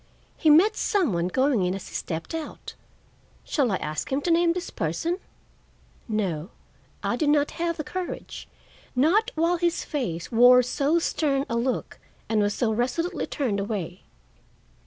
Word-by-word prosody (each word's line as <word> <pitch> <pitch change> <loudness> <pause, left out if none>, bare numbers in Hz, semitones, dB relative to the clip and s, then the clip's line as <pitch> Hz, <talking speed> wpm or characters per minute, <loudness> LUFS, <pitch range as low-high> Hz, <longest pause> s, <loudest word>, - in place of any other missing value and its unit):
"He 315 - +2
met 340 +8 +6
some 370 - +1
one 170 0 0
going 260 +1 +2
in 180 +1 0
as 195 - -8
he - - -14
stepped 160 - -4
out. 325 -1 -6 0.7
Shall 270 -7 0
I - - +2
ask 155 - -4
him 270 - +1
to 340 - 0
name 335 0 +4
this 360 +1 -5
person?" 325 - -2 0.9
No, 190 -7 -2 0.5
I - - 0
did 305 -3 +1
not 295 -1 +3
have 335 -1 0
the 305 - -3
courage; 365 +6 -6 0.5
not 360 - +3
while 335 +2 +2
his 345 0 0
face 210 - -3
wore 245 +2 +7
so 280 +6 +1
stern 285 -4 0
a 235 - -2
look 245 +2 -2 0.3
and 220 -1 +2
was 205 0 +1
so 230 -3 +1
resolutely 260 - -1
turned 235 -9 -1
away. 195 -3 -4
265 Hz, 160 wpm, -25 LUFS, 205-330 Hz, 0.9 s, wore